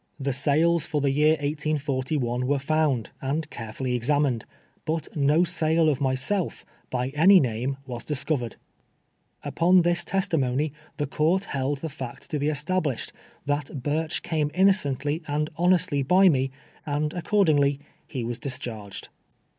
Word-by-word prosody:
The 140 Hz, -1 st, -1 dB
sales 150 Hz, +4 st, +2 dB
for 150 Hz, -1 st, -1 dB
the 140 Hz, -1 st, +1 dB
year 150 Hz, +3 st, +4 dB
1841 145 Hz, -4 st, -1 dB
wei'O 140 Hz, 0 st, +1 dB
found, 145 Hz, -5 st, 0 dB
and 145 Hz, +4 st, -2 dB
carefully 120 Hz, +3 st, -4 dB
examined, 125 Hz, -1 st, +1 dB, 0.4 s
but 160 Hz, 0 st, -2 dB
no 150 Hz, +3 st, +3 dB
sale 160 Hz, -1 st, +2 dB
of 145 Hz, -2 st, -1 dB
myself, 135 Hz, +8 st, -1 dB, 0.2 s
by 125 Hz, 0 st, -1 dB
any 170 Hz, +7 st, +6 dB
name, 125 Hz, 0 st, -1 dB
was 120 Hz, -3 st, -6 dB
discovered 140 Hz, -4 st, -1 dB, 0.9 s
I -, -, -4 dB
Upon 180 Hz, +1 st, +4 dB
this 175 Hz, 0 st, +1 dB
testimony 150 Hz, -6 st, 0 dB, 0.2 s
the 145 Hz, -, 0 dB
court 160 Hz, +7 st, +1 dB
held 140 Hz, -3 st, -2 dB
the 160 Hz, -, -3 dB
fact 135 Hz, +2 st, -8 dB
to 150 Hz, -, -1 dB
be 145 Hz, -, 0 dB
establisheil, 150 Hz, -3 st, -1 dB, 0.3 s
that 145 Hz, 0 st, -1 dB
Ihirch 150 Hz, +3 st, -2 dB
came 155 Hz, -3 st, 0 dB
innocently 155 Hz, -6 st, +2 dB
and 150 Hz, +1 st, -1 dB
honestly 175 Hz, -4 st, +2 dB
by 185 Hz, +8 st, +5 dB
me, 135 Hz, -4 st, +1 dB, 0.3 s
and 150 Hz, +1 st, -1 dB
accordingly 155 Hz, -7 st, +2 dB, 0.3 s
he 130 Hz, -5 st, -4 dB
was 120 Hz, +1 st, -3 dB
discharged. 115 Hz, -6 st, -6 dB
145 Hz, 140 wpm, -25 LUFS, 135-160 Hz, 0.9 s, any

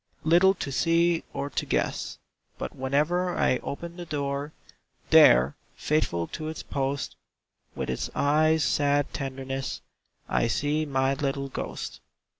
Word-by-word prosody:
Little 175 Hz, +4 st, +5 dB
to 145 Hz, -, -4 dB
see 165 Hz, +3 st, +2 dB
or 140 Hz, +1 st, -4 dB
to -, -, -1 dB
guess; -, -, -1 dB, 0.4 s
But -, -, -5 dB
whenever 155 Hz, +7 st, 0 dB
I 130 Hz, -, +3 dB
open 170 Hz, +4 st, -6 dB
the 175 Hz, -, -6 dB
door, 140 Hz, -1 st, -2 dB, 0.6 s
There, 65 Hz, +3 st, +7 dB, 0.2 s
faithful 115 Hz, -, 0 dB
to 155 Hz, -, -5 dB
its 160 Hz, -, -5 dB
post, 140 Hz, 0 st, -2 dB, 0.6 s
With -, -, -3 dB
its 65 Hz, -, -2 dB
eyes' 155 Hz, +2 st, +3 dB
sad 145 Hz, 0 st, +1 dB
tenderness, 135 Hz, 0 st, -4 dB, 0.5 s
I -, -, +1 dB
see 150 Hz, +6 st, 0 dB
my 135 Hz, -1 st, +1 dB
little 140 Hz, -1 st, -2 dB
ghost. -, -, -5 dB
145 Hz, 130 wpm, -27 LUFS, 135-160 Hz, 0.6 s, There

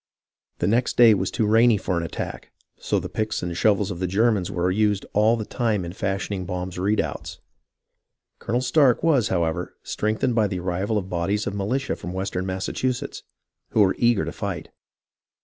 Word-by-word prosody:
The -, -, -1 dB
next 115 Hz, +6 st, +1 dB
day 115 Hz, -2 st, +8 dB
was 95 Hz, -2 st, 0 dB
too 110 Hz, -, 0 dB
rainy 115 Hz, +1 st, +5 dB
for 90 Hz, -, -2 dB
an 85 Hz, -, 0 dB
attack, 85 Hz, -, -5 dB, 0.3 s
so -, -, 0 dB
the -, -, -5 dB
picks 110 Hz, -3 st, -2 dB
and 85 Hz, -1 st, -3 dB
shovels 100 Hz, 0 st, +2 dB
of 85 Hz, -, -6 dB
the 90 Hz, -, -1 dB
Germans 100 Hz, -1 st, +2 dB
were 90 Hz, +1 st, 0 dB
used 105 Hz, 0 st, +1 dB
all 110 Hz, +3 st, +4 dB
the 110 Hz, -, -4 dB
time 110 Hz, -7 st, -1 dB
in 85 Hz, -, -6 dB
fashioning 95 Hz, -1 st, -3 dB
Baum's 90 Hz, -1 st, -4 dB
redoubts. 105 Hz, +3 st, -1 dB, 1.0 s
Colonel 120 Hz, +2 st, -1 dB
Stark 130 Hz, -2 st, +3 dB
was, 140 Hz, -9 st, +3 dB
however, 85 Hz, -1 st, -1 dB
strengthened 110 Hz, +4 st, -1 dB
by 110 Hz, -2 st, +3 dB
the 95 Hz, -2 st, -3 dB
arrival 95 Hz, +4 st, -1 dB
of 95 Hz, -3 st, -3 dB
bodies 95 Hz, +4 st, -1 dB
of 100 Hz, -, -3 dB
militia 120 Hz, +8 st, -1 dB
from 90 Hz, -, -7 dB
west 95 Hz, +2 st, -3 dB
ern 90 Hz, +1 st, -1 dB
Massachusetts 120 Hz, +7 st, -2 dB, 0.5 s
who 110 Hz, -, +4 dB
were 95 Hz, -2 st, +4 dB
eager 120 Hz, -3 st, +3 dB
to -, -, -4 dB
fight. 100 Hz, -7 st, -5 dB
100 Hz, 185 wpm, -24 LUFS, 90-110 Hz, 1.0 s, day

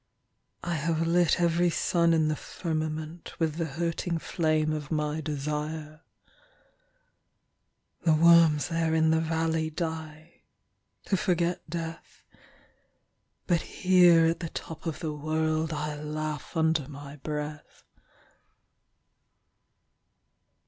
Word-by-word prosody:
I 175 Hz, -, -2 dB
have 165 Hz, +1 st, 0 dB
lit 175 Hz, +1 st, +3 dB
every 170 Hz, 0 st, +3 dB
sun 170 Hz, 0 st, +2 dB
in 160 Hz, -2 st, +3 dB
the 155 Hz, -, +1 dB
firmamentWith 155 Hz, 0 st, -4 dB
the 165 Hz, -, 0 dB
hurting 165 Hz, +2 st, -2 dB
flame 155 Hz, -2 st, 0 dB
of 150 Hz, -2 st, -5 dB
my 150 Hz, 0 st, -1 dB
desire. 150 Hz, +1 st, -4 dB, 2.0 s
The 160 Hz, -2 st, +4 dB
worms 165 Hz, -2 st, +5 dB
there 165 Hz, -1 st, 0 dB
in 160 Hz, 0 st, +3 dB
the 160 Hz, -, +3 dB
valleyDie—to 160 Hz, +2 st, -4 dB
forget 175 Hz, -3 st, 0 dB
death; 165 Hz, 0 st, -6 dB, 1.2 s
But 175 Hz, -2 st, +2 dB
here 175 Hz, -3 st, +5 dB
at 165 Hz, +1 st, +1 dB
the 165 Hz, -, -4 dB
top 165 Hz, +1 st, -7 dB
of 160 Hz, -, -4 dB
the 155 Hz, -3 st, -2 dB
worldI 155 Hz, 0 st, -1 dB
laugh 155 Hz, +1 st, -4 dB
under 160 Hz, -3 st, +2 dB
my 145 Hz, 0 st, -9 dB
breath. 150 Hz, +1 st, -6 dB
160 Hz, 100 wpm, -28 LUFS, 155-165 Hz, 2.0 s, worms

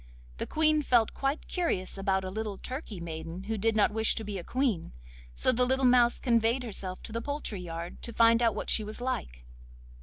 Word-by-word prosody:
The -, -, -4 dB
Queen 310 Hz, -1 st, +3 dB
felt 240 Hz, -6 st, +3 dB
quite 275 Hz, +3 st, -2 dB
curious 335 Hz, -, -1 dB
about 195 Hz, -1 st, 0 dB
a 185 Hz, -, -4 dB
little 215 Hz, -1 st, -4 dB
turkey 255 Hz, -, -6 dB
maiden 165 Hz, +2 st, -6 dB
who 220 Hz, +3 st, -2 dB
did 220 Hz, +1 st, +1 dB
not 210 Hz, 0 st, +4 dB
wish 220 Hz, +1 st, +2 dB
to 225 Hz, -, -4 dB
be 205 Hz, -2 st, -4 dB
a -, -, -7 dB
Queen, 240 Hz, -, -1 dB, 0.4 s
so -, -, +3 dB
the 250 Hz, 0 st, +2 dB
little 260 Hz, +1 st, +2 dB
mouse 245 Hz, -1 st, +5 dB
conveyed 235 Hz, +1 st, +2 dB
herself 190 Hz, -5 st, -4 dB
to -, -, -7 dB
the 230 Hz, +1 st, -3 dB
poultry 285 Hz, -8 st, -4 dB
yard 170 Hz, 0 st, -7 dB
to 235 Hz, -, -4 dB
find 230 Hz, +1 st, +5 dB
out 230 Hz, -1 st, +3 dB
what -, -, -1 dB
she 220 Hz, -, +3 dB
was 215 Hz, +2 st, -5 dB
like. -, -, -4 dB
225 Hz, 210 wpm, -29 LUFS, 190-250 Hz, 0.4 s, mouse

